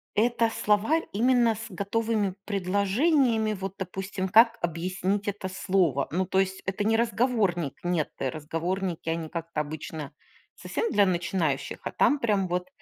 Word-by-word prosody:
Это 230 +1 +2
словарь 220 +13 +1
именно 235 +1 +3
с 225 +2 -7
готовыми 205 0 -1
предложениями, 215 - +2
вот 195 -1 -5
допустим, 190 +1 -4
как 230 +4 +6
объяснить 185 +4 -1
это 200 -2 -3
слово. 185 -7 +1
Ну, 185 +3 0
то 190 - +1
есть, 190 0 0
это 190 +2 -1
не 225 +2 +2
разговорник. 220 - +1
Нет, 175 -3 0
э, 135 - 0
разговорники 165 +4 -3
они 165 0 -2
как-то 165 -2 -3
обычно 150 0 -6 0.4
совсем 460 - -3
для 205 -1 +4
начинающих, 175 -5 -1
а - - -3
там 290 - +3
прям 205 -6 +1
вот 180 0 -2
195 Hz, 145 wpm, -27 LUFS, 175-220 Hz, 0.4 s, как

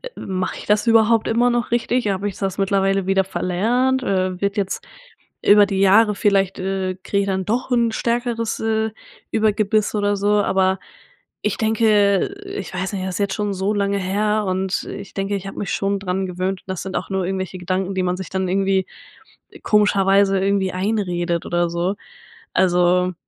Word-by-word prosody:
mache 185 -1 -3
ich - - -9
das 210 +1 +2
überhaupt 225 -1 +4
immer 240 +2 +3
noch 240 -1 -1
richtig? 240 0 0
Habe 195 +1 -1
ich 195 - -10
das 195 -1 -3
mittlerweile 195 -1 +1
wieder 195 0 +3
verlernt, 235 +8 0
äh, 185 -4 -1
wird 200 +1 -1
jetzt 195 -2 -2 0.6
über 205 0 +7
die 195 -1 -2
Jahre 210 +3 +5
vielleicht, 195 -2 +1
äh, 190 0 -2
kriege 200 - 0
ich - - -1
dann 190 -1 -1
doch 240 +5 -2
'n 235 -2 +2
stärkeres, 235 0 -1
äh, 220 0 0 0.4
Übergebiss“ 215 -1 +1
oder 205 0 +1
so, 205 +1 +2
aber 190 -1 +1 0.6
ich 210 - -1
denke 215 -3 +3 0.2
ich 395 +1 -6
weiß 190 0 -3
nicht, 190 -2 -3
das 185 -1 -4
ist - - -4
jetzt 200 -1 0
schon 205 -1 -2
so 195 +2 -1
lange 200 -1 0
her 210 +3 0
und 190 0 -1
ich - - -8
denke, 195 +1 -1
ich 195 0 -8
habe 195 - -8
mich 200 - -3
schon 200 0 0
daran 190 0 -2
gewöhnt 185 +1 -3
und - - -23
das 185 -2 -3
sind 190 0 -3
auch - - -5
nur 190 -2 -1
irgendwelche 190 0 -3
Gedanken, 185 +2 -2
die 185 - 0
man 180 0 -1
sich 190 -2 -7
dann 190 0 -2
irgendwie 195 0 +1 0.8
komischerweise 200 -2 +3
irgendwie 195 -1 0
einredet 180 -4 -1
oder 175 0 0
so. 170 +3 -1 0.6
Also 180 0 +3
195 Hz, 185 wpm, -21 LUFS, 190-210 Hz, 0.8 s, über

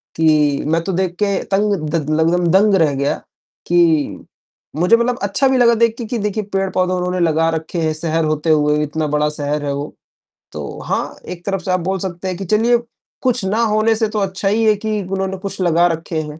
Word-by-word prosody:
कि 150 -3 +2
मैं 165 +1 +1
तो 195 - -2
देख 185 0 0
के 200 -1 +1
तंग, 205 +1 +2 0.2
द 155 -2 -2
लगभग 165 +3 +2
दंग 200 +2 +4
रह 160 -6 +3
गया 140 +1 0 0.5
कि 170 -4 +2 0.6
मुझे 180 +8 +4
मतलब 240 +1 0
अच्छा 205 +7 +1
भी 265 -1 +2
लगा 235 -1 +5
देख 230 0 +2
के 235 - -5
कि 235 +2 -3
देखिए 210 +1 -2
पेड़-पौधे 185 -1 0
उन्होंने 180 0 -1
लगा 165 -1 +2
रखे 160 +1 -3
हैं 155 -1 0
शहर 160 +1 -1
होते 155 +1 -1
हुए 150 -1 +3
इतना 150 +1 -2
बड़ा 150 0 +1
शहर 145 0 -3
है 140 - -1
वो, 145 +1 -5 0.6
तो - - -7
हाँ, - - -2
एक 175 -1 -8
तरफ़ 195 -2 -2
से 185 - -2
आप 185 - +2
बोल 190 +2 -2
सकते 185 0 -5
हैं 185 -2 -3
कि 195 - -5
चलिए 225 +5 +3 0.4
कुछ 250 -4 +1
ना 215 +4 0
होने 220 0 +2
से 220 0 0
तो 215 - -2
अच्छा 195 0 -2
ही 225 +2 +1
है 215 - +4
कि 215 0 -2
उन्होंने 190 +1 -3
कुछ 195 +1 -6
लगा 175 -1 +3
रखे 165 -1 -3
हैं, 150 0 -8
180 Hz, 215 wpm, -18 LUFS, 160-205 Hz, 0.6 s, लगा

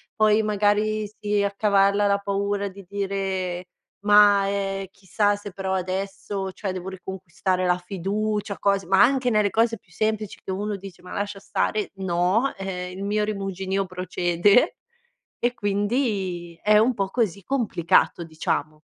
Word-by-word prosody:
Poi 215 0 +4
magari 210 0 +1
si 205 -1 -1
accavalla 200 0 +3
la 200 0 +3
paura 200 0 -1
di 195 +1 -10
dire: 190 -3 -2 0.4
“Ma, 205 -1 +6
ehm, 195 -1 -2
chissà 205 +2 0
se 205 -1 -8
però 190 0 -3
adesso, 195 +1 -3
cioè, 195 -3 -4
devo 185 0 -5
riconquistare 185 0 -3
la 180 0 +3
fiducia”, 200 +3 -2
cose 200 -3 +1
ma 195 +3 +6
anche 255 0 +3
nelle 210 -3 +2
cose 230 0 +2
più 175 - -30
semplici 215 +2 -2
che - - -10
uno 205 +1 -2
dice: 190 -2 -12
“Ma 180 - -11
lascia 205 0 -3
stare”, 210 +1 -1
no, 190 +7 +1
ehm, 180 -2 -4
il 195 - -5
mio 210 +1 0
rimuginio 195 -2 -2
procede 185 - +2 0.6
e 240 0 +1
quindi 200 -6 -1
è 210 0 +5
un 235 +4 +3
po' 195 -3 -1
così, 200 -4 -1
complicato, 185 -9 +2
diciamo. 155 -1 -2
200 Hz, 145 wpm, -24 LUFS, 190-210 Hz, 0.6 s, Ma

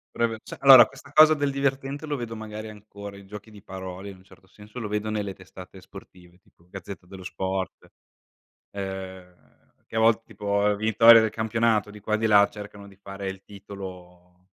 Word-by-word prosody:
Preve 115 -2 -1
cioè - - -10
allora 130 -5 +9
questa 140 - -16
cosa 155 +1 +7
del 145 -1 -1
divertente, 140 +1 -2
lo 150 -2 -3
vedo 115 -2 -6
magari 110 0 -8
ancora, 100 -1 -11
i 100 0 -14
giochi 105 +2 -11
di 105 -2 -15
parole 95 +1 -8
in 95 - -11
un 95 - -22
certo 95 -1 -20
senso 105 +4 -16
lo 110 -3 -5
vedo 105 +1 -2
nelle 105 -2 -3
testate 95 0 -13
sportive, 90 -2 -15
tipo 85 -1 -30
Gazzetta 95 0 -10
dello 95 0 -11
Sport. 95 0 -5 0.8
Ehm, 95 -2 -7 0.5
che - - -11
a 110 - +1
volte 115 0 +3
tipo 100 -1 -1
vittoria 110 +2 +6
del 110 -1 0
campionato 110 -2 0
di 105 0 -12
qua 105 +1 -4
e - - +3
di 110 - +1
là 100 -1 +6
cercano 105 -1 -11
di 100 - -17
fare 100 0 -7
il 95 0 -8
titolo 90 -3 -12
100 Hz, 190 wpm, -25 LUFS, 95-110 Hz, 0.8 s, allora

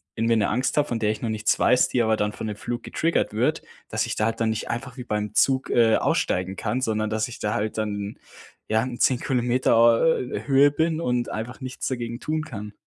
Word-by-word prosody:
irgendwie 115 +1 +2
'ne 105 -3 +2
Angst 125 +5 0
habe, 145 - +3
von 120 - -2
der 105 -2 +1
ich 110 - -6
noch 115 - -2
nichts 110 0 +1
weiß, 125 +1 +4
die 125 - +1
aber 110 -1 +2
dann 105 0 -1
von 110 - -5
dem 105 - -4
Flug 120 +3 -5
getriggert 165 +1 0
wird, - - +1 0.3
dass - - -1
ich - - -3
da 105 - +1
halt 115 +1 -2
dann 115 - +2
nicht 110 0 -3
einfach 125 0 -5
wie 125 - -5
beim 105 -2 -3
Zug, 135 -1 +2
äh, 115 -2 +4
aussteigen 95 +1 0
kann, 115 +6 -2
sondern 110 -2 -1
dass 110 0 0
ich 120 - -9
da 105 - -1
halt 105 +1 -2
dann, 105 -1 -3 0.5
ja, 110 +1 +2
in 125 -1 -5
10 130 -2 +3
Kilometer, 125 -1 +1 0.4
äh, 125 - -5
Höhe 140 +1 +5
bin 160 +2 0
und 125 -4 -1
einfach 115 +5 -6
nichts 130 -1 -5
dagegen 120 -2 -4
tun 155 +2 -2
kann. 105 -7 -8
115 Hz, 235 wpm, -24 LUFS, 110-125 Hz, 0.5 s, Höhe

